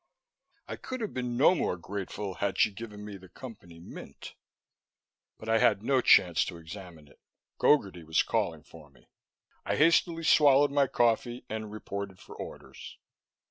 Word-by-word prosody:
I - - -6
could 255 0 -6
have 215 - -4
been 125 -2 -3
no 145 +7 +6
more 125 - -1
grateful 100 +2 -5
had 100 +1 -2
she 110 - +3
given 105 0 -9
me 100 -2 -8
the 95 -1 -16
Company 90 -8 -12
Mint. 85 - -11 1.0
But 110 - -11
I 115 0 +3
had 100 - +3
no 130 +1 +2
chance 90 -7 +5
to 85 - -7
examine 85 -2 -11
it. - - -22 0.4
Gogarty 95 - +2
was 80 +1 +1
calling 90 -9 -2
for 80 -2 -15
me. 65 - -26 0.5
I - - -1
hastily 165 +1 +3
swallowed 145 -2 +5
my 140 -1 +3
coffee 120 +1 0
and 110 -1 -5
reported 100 -2 -6
for - - -13
orders. - - -10
105 Hz, 160 wpm, -29 LUFS, 90-125 Hz, 1.0 s, no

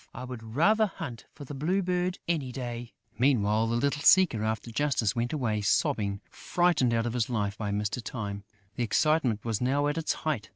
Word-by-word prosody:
"I 125 - -6
would 125 -2 -7
rather 215 +8 +4
hunt 155 - -8
for 145 - -11
the 145 - -8
Blue 175 +8 0
Bird, 180 0 -1
any 150 -7 -1
day!" 120 -1 -6 0.2
Meanwhile, 115 -4 +3
the 115 - 0
little 140 +4 0
seeker 170 - +5
after 110 +1 -2
justice 120 -5 0
went 120 +1 -1
away 115 -8 -1
sobbing, 100 0 +1
frightened 175 -8 +1
out 115 0 +1
of 120 - -2
his 120 -2 0
life 105 -4 -1
by 105 -2 -4
Mr. 105 +3 -2
Time. 100 -4 -5 0.3
The 120 - 0
excitement 125 -3 +1
was 115 -2 -1
now 140 +3 +1
at 145 +3 0
its 160 - 0
height. 130 -10 -3
125 Hz, 195 wpm, -28 LUFS, 110-150 Hz, 0.3 s, seeker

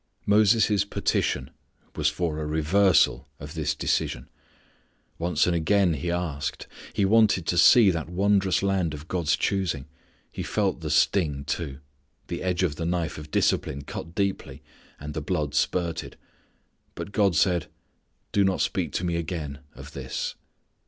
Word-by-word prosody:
Moses' 105 -1 +4
petition 70 -8 -1 0.4
was 75 -1 +2
for 80 0 -2
a 75 - -3
reversal 80 0 +3
of 75 +2 -8
this 75 -2 -1
decision. 65 -3 -1 0.9
Once 85 +1 +1
and 90 - +1
again 90 +2 +2
he 80 +3 -3
asked. 85 -5 -3 0.3
He 100 - +1
wanted 105 -4 +4
to 85 - 0
see 105 +3 +7
that 80 -2 -4
wondrous 95 +1 +2
land 95 -5 0
of 75 +2 -10
God's 85 -5 +1
choosing. 90 -9 -1 0.5
He - - -6
felt - - -1
the - - -4
sting 75 -8 +2
too. 70 -1 -4 0.5
The - - -4
edge 90 -1 0
of 75 -5 -1
the 85 - -3
knife 85 -3 -2
of 75 0 -10
discipline 70 -1 0
cut 85 +4 -8
keenly, 100 -1 -2 0.4
and 75 +1 -7
the 80 - -3
blood 75 -2 -2
spurted. 85 +1 -1 0.8
But 100 - -6
God 100 -5 +2
said: 90 +1 +2 0.6
"Do 100 - +3
not 95 -1 +1
speak - - -1
to - - -2
Me 85 -1 0
again 80 -4 -4 0.2
of - - -11
this." - - -4
85 Hz, 150 wpm, -26 LUFS, 75-95 Hz, 0.9 s, see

